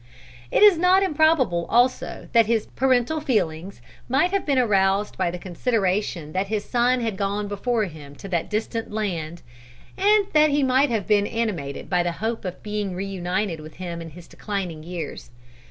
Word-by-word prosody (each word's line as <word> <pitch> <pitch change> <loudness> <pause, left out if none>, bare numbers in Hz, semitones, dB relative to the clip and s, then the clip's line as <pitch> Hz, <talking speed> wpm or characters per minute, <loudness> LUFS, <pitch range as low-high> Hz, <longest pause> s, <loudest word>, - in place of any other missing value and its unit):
It - - +3
is 400 -6 +7
not 370 +2 +4
improbable 300 - +2
also 245 +2 +1
that 230 -2 +5
his 225 -2 +1
parental 260 +4 +1
feelings 185 - -2 0.3
might 285 +8 +2
have 395 -3 -1
been 280 -2 +2
aroused 200 -4 +2
by 185 -2 0
the 175 - -5
consideration 185 -3 -1
that 190 +4 -1
his 210 0 -2
son 245 +1 +2
had 225 -3 -2
gone 200 +1 -2
before 220 +3 -1
him 150 -6 -8
to 195 - -10
that 170 -3 -1
distant 225 +1 -3
land; 175 -6 -3 0.6
and 415 +1 +4
that 305 0 +5
he 285 0 +1
might 265 +2 +3
have 220 -5 -1
been 205 -1 +2
animated 195 -12 -3
by 180 -2 +1
the 175 -1 -1
hope 225 +4 -3
of 180 -1 -6
being 210 -3 -3
reunited 185 -1 -2
with 155 0 -11
him 170 -2 -6
in 165 - -7
his 165 +2 -13
declining 185 -7 -5
years. 165 -1 -7
205 Hz, 175 wpm, -23 LUFS, 180-250 Hz, 0.6 s, is